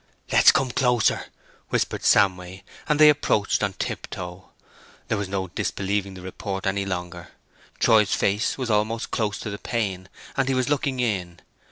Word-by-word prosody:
"Let's - - +7
come 130 -2 0
closer," 125 -4 +2 0.4
whispered - - -1
Samway; 95 -1 +2 0.3
and 150 0 +2
they 155 - +9
approached 140 -8 +2
on 100 -2 0
tiptoe. 90 0 -6 0.6
There 110 - +1
was 100 -2 -4
no 95 -2 -3
disbelieving 100 +2 -2
the 90 - -10
report 95 +1 -5
any 100 0 0
longer. 90 -2 -5 0.5
Troy's 110 -3 +4
face 105 +2 0
was 130 -4 -2
almost 110 +2 0
close 105 -3 -1
to 110 - -5
the 100 - -6
pane, 95 -5 -3 0.3
and 135 -1 0
he 135 - +1
was 130 0 0
looking 140 -2 0
in. 95 -8 -2
100 Hz, 160 wpm, -24 LUFS, 95-115 Hz, 0.6 s, they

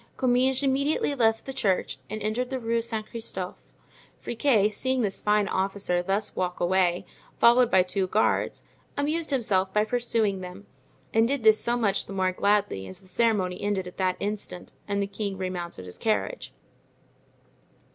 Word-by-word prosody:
Comminges 255 +1 +2
immediately 280 +2 +1
left 225 -4 +2
the 270 - -5
church 195 -8 0
and 215 +1 -5
entered 235 +4 -1
the 265 - -2
Rue 230 0 0
Saint 220 -2 -3
Christophe. 190 -5 -5 0.6
Friquet, 225 -4 +2
seeing 260 +3 0
this 200 -2 -2
fine 210 -1 +2
officer 190 -2 0
thus 195 +3 -2
walk 180 -1 -2
away, 175 0 +2 0.3
followed 240 +1 +6
by 185 -5 +5
two 185 +1 -1
guards, 215 +4 +1 0.3
amused 310 +3 0
himself 200 -8 +1
by 210 +2 +2
pursuing 225 -4 0
them 185 +2 -9 0.5
and 225 +1 +4
did 275 -2 -1
this 220 -1 +6
so 240 +1 +1
much 200 -4 0
the 195 - -7
more 185 -1 +1
gladly 200 - +1
as 95 - -8
the 190 - -18
ceremony 185 -3 +1
ended 205 -2 -1
at 180 - -10
that 185 -1 0
instant 200 -3 -5 0.2
and 200 -1 0
the - - 0
king 200 0 -4
remounted 175 - -5
his 90 - -10
carriage. 225 - -1
210 Hz, 165 wpm, -26 LUFS, 190-235 Hz, 0.6 s, followed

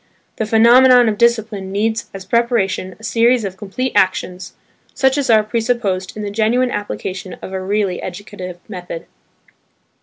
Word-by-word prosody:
The 220 - -2
phenomenon 245 +2 +6
of 210 -2 -1
discipline 220 -5 +1
needs 220 +3 -1
as 195 -1 -9
preparation 200 -4 0
a - - -17
series 230 0 +2
of 190 -1 -5
complete 225 +6 -4
actions, 185 -1 0 0.4
such 265 0 +2
as 280 -3 -1
are 220 -2 +5
presupposed 215 -4 -2
in 210 - -4
the 205 - -4
genuine 235 +4 +1
application 190 -2 -5
of 190 - -7
a 190 - -3
really 195 -1 -1
educative 185 -1 -7
method. 180 -4 -7
215 Hz, 150 wpm, -18 LUFS, 190-235 Hz, 0.4 s, phenomenon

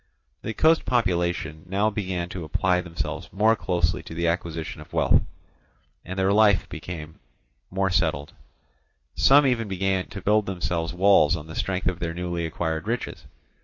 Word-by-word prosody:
The 110 - -5
coast 160 +1 +4
population 85 -9 0
now 100 +3 +1
began 95 -4 -3
to 90 -1 -6
apply 90 +3 +1
themselves 80 -1 -5
more 110 +4 +3
closely 85 -5 0
to 80 - -10
the 85 +1 0
acquisition 85 -2 -3
of - - -15
wealth, - - +4 0.8
and 95 +2 -7
their 95 +1 +2
life 105 -2 +4
became 80 -3 -8 0.5
more 95 0 0
settled; 80 -3 0 0.8
some 140 +2 +5
even 120 -4 +1
began 95 -1 -1
to 100 - -8
build 105 +2 +2
themselves 85 -3 -2
walls 95 -4 +4
on 75 - -6
the 80 - -10
strength 95 -1 -2
of 90 -2 0
their 85 -1 -3
newly 85 -1 -2
acquired 80 +1 -3
riches. 120 +2 -3
90 Hz, 160 wpm, -25 LUFS, 85-100 Hz, 0.8 s, some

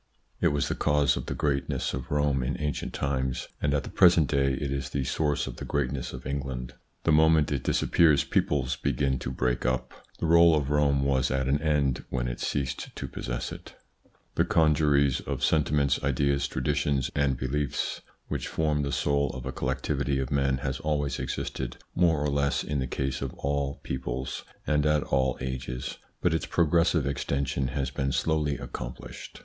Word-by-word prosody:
It - - +3
was 75 -1 +1
the - - 0
cause 75 -1 +2
of - - -5
the - - -3
greatness 70 -2 -1
of 65 0 -5
Rome 75 -2 +1
in 65 +3 -2
ancient 75 -3 -2
times, 65 -2 -2
and 75 - +1
at 70 -1 +1
the - - -8
present 85 -6 +5
day 70 -2 +2
it 70 +1 -3
is 70 -2 -2
the 70 - -1
source 75 +2 0
of - - -7
the - - -6
greatness 70 -2 -2
of - - -9
England. 65 -2 -4 0.3
The 80 - +3
moment 80 -1 +5
it 70 -3 0
disappears, 80 -4 +3
peoples 65 -2 0
begin 65 -1 0
to 65 - -4
break 60 -1 -1
up, 65 +1 -1 0.2
The - - -2
role 85 0 +6
of 75 -2 -1
Rome 70 -2 +3
was 70 -1 +2
at 65 0 0
an 70 +2 +1
end 70 -5 +1
when - - -1
it - - -4
ceased 70 -3 -3
to - - -5
possess - - -4
it. - - -10 0.6
The - - +3
congeries 75 -4 +3
of - - -4
sentiments, 75 -2 +2
ideas, 70 0 +1
traditions, 70 0 0
and 70 -3 +1
beliefs 70 +2 -2 0.3
which - - -3
form 75 -2 0
the 70 0 -2
soul 70 0 +1
of 65 -1 -7
a 65 - -3
collectivity 70 +1 -1
of 65 +1 -2
men 70 -2 +2
has 65 0 -2
always 75 -2 -1
existed 65 -2 -4 0.2
more 85 -3 +3
or 75 - +1
less 70 0 +1
in 75 -1 -2
the 65 - -1
case 65 +1 -2
of 65 -2 -4
all 70 0 -2
peoples 65 0 -4 0.2
and 75 0 +2
at 75 -1 +3
all 65 -2 +1
ages, 65 -1 -4 0.2
but 90 - +2
its 80 - -1
progressive 85 -2 +3
extension 70 -1 -1
has 65 -1 -2
been 70 0 -1
slowly 75 -1 +1
accomplished. - - -8
70 Hz, 185 wpm, -28 LUFS, 65-75 Hz, 0.6 s, role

